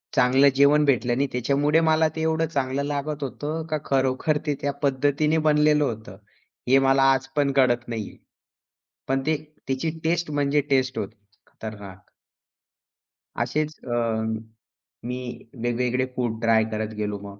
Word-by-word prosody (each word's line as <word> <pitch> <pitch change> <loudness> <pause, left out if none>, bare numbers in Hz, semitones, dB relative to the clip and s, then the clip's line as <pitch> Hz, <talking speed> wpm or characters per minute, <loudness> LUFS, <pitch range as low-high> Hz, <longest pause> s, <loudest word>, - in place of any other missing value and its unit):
चांगलं 130 +3 +5
जेवण 140 +2 +5
भेटलं 120 -3 +2
नाही 140 - +1
त्याच्यामुळे 140 +5 +2
मला 160 0 +4
ते 160 - -3
एवढं 160 0 +1
चांगलं 140 -2 -1
लागत 145 0 -3
होतं, 150 +4 -4
का 155 - 0
खरोखर 135 +3 +1
ते 145 - 0
त्या 140 - 0
पद्धतीने 145 +3 +2
बनलेलं 150 0 +4
होतं. 110 -6 -5 0.5
हे 135 +2 +6
मला 135 0 +3
आज 135 0 -2
पण 140 -1 +2
कळत 120 -3 +2
नाहीये. 110 -3 -5 0.9
पण 135 0 +1
ते 155 - +2 0.3
त्याची 135 +5 -1
टेस्ट 170 0 0
म्हणजे 145 0 +1
टेस्ट 130 -1 +1
होती. 105 +3 -5 0.3
खतरनाक. 100 -3 -10 1.3
असेच 150 +6 -1
अ, 120 -1 -2 1.1
मी 125 0 -3 0.5
वेगवेगळे 125 +1 0
फूड 120 -3 -2
ट्राय 115 -1 +4
करत 110 0 -3
गेलो 105 -1 -3
मग. 100 0 -11
135 Hz, 140 wpm, -24 LUFS, 120-150 Hz, 1.3 s, हे